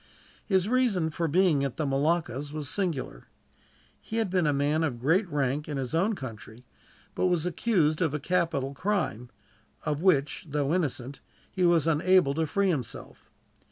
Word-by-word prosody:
His 190 Hz, -2 st, +2 dB
reason 220 Hz, -10 st, +1 dB
for 165 Hz, +2 st, -1 dB
being 165 Hz, -3 st, +3 dB
at 135 Hz, -3 st, -3 dB
the 155 Hz, -, -1 dB
Moluccas 145 Hz, -1 st, 0 dB
was 150 Hz, -2 st, -5 dB
singular. 160 Hz, -, -3 dB, 0.7 s
He 220 Hz, -, -7 dB
had 220 Hz, -5 st, 0 dB
been 180 Hz, -4 st, +2 dB
a -, -, +3 dB
man 145 Hz, +3 st, +1 dB
of 130 Hz, -7 st, -2 dB
great 170 Hz, -, +2 dB
rank 145 Hz, 0 st, -1 dB
in 145 Hz, -, -3 dB
his 130 Hz, -2 st, -4 dB
own 195 Hz, +7 st, +1 dB
country, 115 Hz, -, -9 dB, 0.5 s
but -, -, +1 dB
was 175 Hz, -2 st, 0 dB
accused 175 Hz, -4 st, +1 dB
of 160 Hz, -5 st, +2 dB
a 150 Hz, -, -2 dB
capital 150 Hz, -4 st, -1 dB
crime; 150 Hz, -, -2 dB, 0.6 s
of 150 Hz, 0 st, -1 dB
which, 160 Hz, -4 st, +1 dB
though 145 Hz, +1 st, 0 dB
innocent, 140 Hz, -6 st, -2 dB, 0.3 s
he 185 Hz, -2 st, +1 dB
was 170 Hz, -3 st, +3 dB
unable 165 Hz, -1 st, +3 dB
to 160 Hz, +1 st, -1 dB
free 200 Hz, +5 st, +1 dB
himself. 135 Hz, -9 st, -5 dB
155 Hz, 165 wpm, -28 LUFS, 140-180 Hz, 0.7 s, being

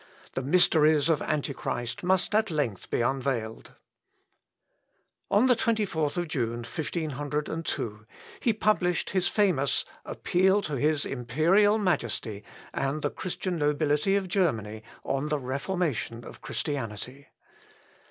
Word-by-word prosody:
The -, -, -1 dB
mysteries 155 Hz, 0 st, +4 dB
of 160 Hz, -2 st, +2 dB
Antichrist 135 Hz, -5 st, -2 dB
must 185 Hz, +2 st, +1 dB
at 220 Hz, 0 st, +3 dB
length 145 Hz, -, -2 dB
be -, -, 0 dB
unveiled." 125 Hz, -3 st, -2 dB, 1.6 s
On 210 Hz, +5 st, +4 dB
the 250 Hz, -1 st, +5 dB
24th 180 Hz, -8 st, 0 dB
June, 120 Hz, -5 st, -2 dB
1502, 145 Hz, -5 st, -3 dB, 0.3 s
he 235 Hz, -, +2 dB
published 205 Hz, -5 st, +1 dB
his 185 Hz, -2 st, +2 dB
famous 180 Hz, -10 st, +2 dB, 0.2 s
'_Appeal 190 Hz, +3 st, +2 dB
to 150 Hz, -, -4 dB
his 150 Hz, +2 st, +1 dB
Imperial 160 Hz, -, +3 dB
Majesty, 120 Hz, -, -1 dB, 0.3 s
and 140 Hz, +2 st, -1 dB
the 145 Hz, -, 0 dB
Christian 185 Hz, -1 st, -3 dB
Nobility 150 Hz, +5 st, +2 dB
of 195 Hz, -2 st, 0 dB
Germany, 115 Hz, -, 0 dB, 0.2 s
on 135 Hz, +2 st, -1 dB
the 150 Hz, -, +1 dB
Reformation 135 Hz, -, -2 dB
of -, -, -11 dB
Christianity. 130 Hz, -1 st, -4 dB
150 Hz, 115 wpm, -28 LUFS, 130-180 Hz, 1.6 s, the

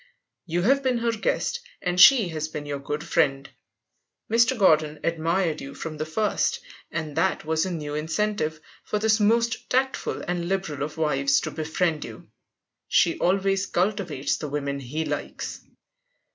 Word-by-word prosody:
You 175 Hz, +1 st, 0 dB
have 275 Hz, +6 st, +4 dB
been 260 Hz, -2 st, +1 dB
her 235 Hz, 0 st, +1 dB
guest, 230 Hz, -, -1 dB, 0.2 s
and 180 Hz, -1 st, +1 dB
she 220 Hz, -1 st, +8 dB
has 155 Hz, -1 st, -3 dB
been 150 Hz, -1 st, -6 dB
your 145 Hz, -1 st, -4 dB
good 145 Hz, +2 st, -4 dB
friend. 140 Hz, -5 st, +1 dB, 0.8 s
Mr. 235 Hz, +3 st, +4 dB
Gordon 155 Hz, -6 st, +3 dB
admired 165 Hz, 0 st, 0 dB
you 140 Hz, -, -8 dB
from 155 Hz, -1 st, -6 dB
the 155 Hz, +1 st, -3 dB
first, 215 Hz, -, 0 dB, 0.3 s
and 155 Hz, -3 st, -4 dB
that 175 Hz, -1 st, +1 dB
was 160 Hz, +3 st, +1 dB
a -, -, -3 dB
new 150 Hz, -4 st, -4 dB
incentive 160 Hz, +1 st, -1 dB, 0.2 s
for 210 Hz, -, -2 dB
this 220 Hz, +1 st, +2 dB
most 230 Hz, +2 st, +1 dB
tactful 265 Hz, +1 st, 0 dB
and 175 Hz, -1 st, -2 dB
liberal 190 Hz, -7 st, -2 dB
of 150 Hz, +2 st, -4 dB
wives 140 Hz, -3 st, +2 dB
to 155 Hz, -, -4 dB
befriend 160 Hz, +1 st, -1 dB
you. -, -, -11 dB, 0.6 s
She -, -, +3 dB
always 195 Hz, +1 st, +1 dB
cultivates 180 Hz, -6 st, -1 dB
the 150 Hz, -, -5 dB
women 140 Hz, -1 st, -2 dB
he 145 Hz, +5 st, -4 dB
likes. -, -, -5 dB
165 Hz, 160 wpm, -25 LUFS, 150-205 Hz, 0.8 s, she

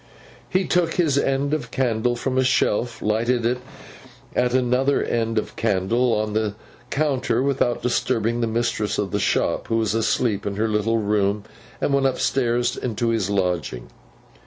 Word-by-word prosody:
He 185 Hz, 0 st, +1 dB
took 170 Hz, -1 st, +1 dB
his 160 Hz, -6 st, +2 dB
end 140 Hz, +1 st, +1 dB
of 135 Hz, -7 st, -2 dB
candle 120 Hz, -1 st, 0 dB
from 130 Hz, +2 st, -2 dB
a -, -, +4 dB
shelf, 120 Hz, -2 st, +1 dB
lighted 115 Hz, +3 st, +1 dB
it 125 Hz, +1 st, +1 dB, 0.8 s
at 125 Hz, -, +2 dB
another 130 Hz, +2 st, +2 dB
end 115 Hz, -1 st, -1 dB
of 110 Hz, -, -2 dB
candle 115 Hz, +4 st, +1 dB
on 105 Hz, 0 st, -1 dB
the 110 Hz, -1 st, -1 dB, 0.3 s
counter, 130 Hz, -5 st, 0 dB
without 135 Hz, -3 st, 0 dB
disturbing 120 Hz, -1 st, 0 dB
the 115 Hz, -, +1 dB
mistress 115 Hz, -2 st, -1 dB
of 100 Hz, -3 st, -2 dB
the -, -, 0 dB
shop -, -, 0 dB
who 115 Hz, -, +1 dB
was 110 Hz, -3 st, +1 dB
asleep 110 Hz, -2 st, +1 dB
in 100 Hz, -, -3 dB
her 110 Hz, +2 st, 0 dB
little 110 Hz, +1 st, +1 dB
room, 105 Hz, -1 st, 0 dB, 0.4 s
and 140 Hz, -, 0 dB
went 135 Hz, -1 st, +3 dB
upstairs 120 Hz, -2 st, 0 dB
into 120 Hz, -1 st, -2 dB
his 110 Hz, -4 st, 0 dB
lodging. 90 Hz, -10 st, -2 dB
115 Hz, 160 wpm, -23 LUFS, 105-130 Hz, 0.8 s, a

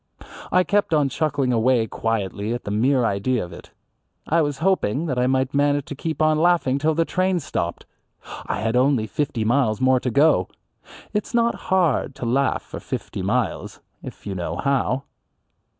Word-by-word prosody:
I 180 Hz, -, +4 dB
kept 205 Hz, -4 st, +1 dB
on 145 Hz, -2 st, +2 dB
chuckling 140 Hz, -2 st, 0 dB
away 120 Hz, 0 st, +3 dB
quietly 110 Hz, -1 st, -2 dB
at 120 Hz, -, -7 dB
the 100 Hz, -, -5 dB
mere 125 Hz, +4 st, +2 dB
idea 110 Hz, +2 st, 0 dB
of 85 Hz, -, -12 dB
it. -, -, -12 dB, 0.6 s
I 165 Hz, +2 st, +2 dB
was 145 Hz, -2 st, -1 dB
hoping 160 Hz, -, +1 dB
that 130 Hz, -6 st, -1 dB
I 125 Hz, -, +2 dB
might 130 Hz, +1 st, 0 dB
manage 145 Hz, 0 st, +2 dB
to 145 Hz, -, -7 dB
keep 160 Hz, +2 st, -2 dB
on 155 Hz, 0 st, +3 dB
laughing 165 Hz, -6 st, +2 dB
till 155 Hz, +2 st, +1 dB
the 165 Hz, +1 st, +2 dB
train 185 Hz, +1 st, 0 dB
stopped. 85 Hz, -, -4 dB, 0.6 s
I -, -, -2 dB
had 115 Hz, +2 st, 0 dB
only 130 Hz, -3 st, +3 dB
fifty 130 Hz, -2 st, -2 dB
miles 115 Hz, -2 st, +2 dB
more 130 Hz, 0 st, +3 dB
to 125 Hz, -, -2 dB
go. 140 Hz, -, +3 dB, 0.7 s
It's 210 Hz, +3 st, -2 dB
not 235 Hz, 0 st, +3 dB, 0.2 s
hard 170 Hz, -7 st, +1 dB
to 125 Hz, -, -5 dB
laugh 135 Hz, +4 st, +1 dB
for -, -, -8 dB
fifty -, -, -5 dB
miles -, -, -2 dB, 0.2 s
if -, -, -10 dB
you 100 Hz, -, -3 dB
know 85 Hz, -3 st, -4 dB
how. 135 Hz, +4 st, 0 dB
135 Hz, 180 wpm, -22 LUFS, 115-155 Hz, 0.7 s, I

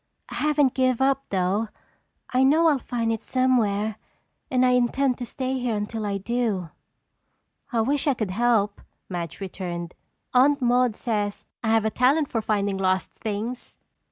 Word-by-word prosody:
I -, -, -8 dB
haven't 295 Hz, -3 st, +2 dB
given 255 Hz, -2 st, +2 dB
up 275 Hz, 0 st, 0 dB
though. 195 Hz, +3 st, 0 dB, 0.7 s
I 255 Hz, -, +3 dB
know 305 Hz, +5 st, +4 dB
I'll 290 Hz, -3 st, +2 dB
find 230 Hz, -2 st, -1 dB
it 225 Hz, -, -4 dB
somewhere 220 Hz, -5 st, +1 dB, 0.5 s
and 255 Hz, 0 st, +3 dB
I 250 Hz, -, +4 dB
intend 250 Hz, +1 st, +2 dB
to 245 Hz, -, -4 dB
stay 260 Hz, 0 st, -2 dB
here 245 Hz, -3 st, -1 dB
until 210 Hz, +1 st, -3 dB
I 200 Hz, -1 st, -1 dB
do." 200 Hz, -5 st, -1 dB, 1.0 s
"I 230 Hz, -2 st, +2 dB
wish 280 Hz, +6 st, 0 dB
I 280 Hz, -, +3 dB
could 215 Hz, -5 st, -2 dB
help," 210 Hz, -1 st, +1 dB, 0.3 s
Madge 175 Hz, -3 st, -5 dB
returned. 175 Hz, -3 st, -5 dB, 0.4 s
"Aunt 280 Hz, +3 st, +5 dB
Maude 245 Hz, -2 st, +2 dB
says 210 Hz, -4 st, -2 dB, 0.2 s
I 220 Hz, -, 0 dB
have 225 Hz, -1 st, +3 dB
a 220 Hz, -, +1 dB
talent 275 Hz, +6 st, +2 dB
for 225 Hz, -, -1 dB
finding 200 Hz, -2 st, 0 dB
lost 185 Hz, 0 st, +1 dB
things. 225 Hz, +3 st, -5 dB
230 Hz, 160 wpm, -25 LUFS, 205-255 Hz, 1.0 s, Aunt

